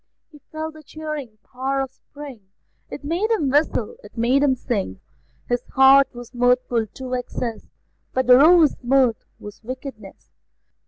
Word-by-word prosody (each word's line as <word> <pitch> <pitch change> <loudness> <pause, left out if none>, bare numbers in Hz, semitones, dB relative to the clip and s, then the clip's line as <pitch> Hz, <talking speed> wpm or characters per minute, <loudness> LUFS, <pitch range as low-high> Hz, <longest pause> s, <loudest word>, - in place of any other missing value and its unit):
He 300 - -16
felt 315 0 -5
the 310 - -13
cheering 305 -7 -7
power 265 +2 -3
of 270 -1 -3
spring; 275 -9 -12 0.4
It 290 - -8
made 345 +9 -1
him 315 - +1
whistle, 315 - 0
it - - -15
made 245 +4 +2
him 280 -2 +3
sing: 200 - -3 0.5
His 245 0 0
heart 270 0 +7
was 245 +1 -10
mirthful 245 -2 +1
to 255 +4 -8
excess, 245 -2 -4 0.4
But 260 0 0
the 250 0 +8
Rover's 320 +1 +6
mirth 250 -2 +2
was 205 -1 -11
wickedness. 250 -4 -9
260 Hz, 150 wpm, -22 LUFS, 245-290 Hz, 0.5 s, the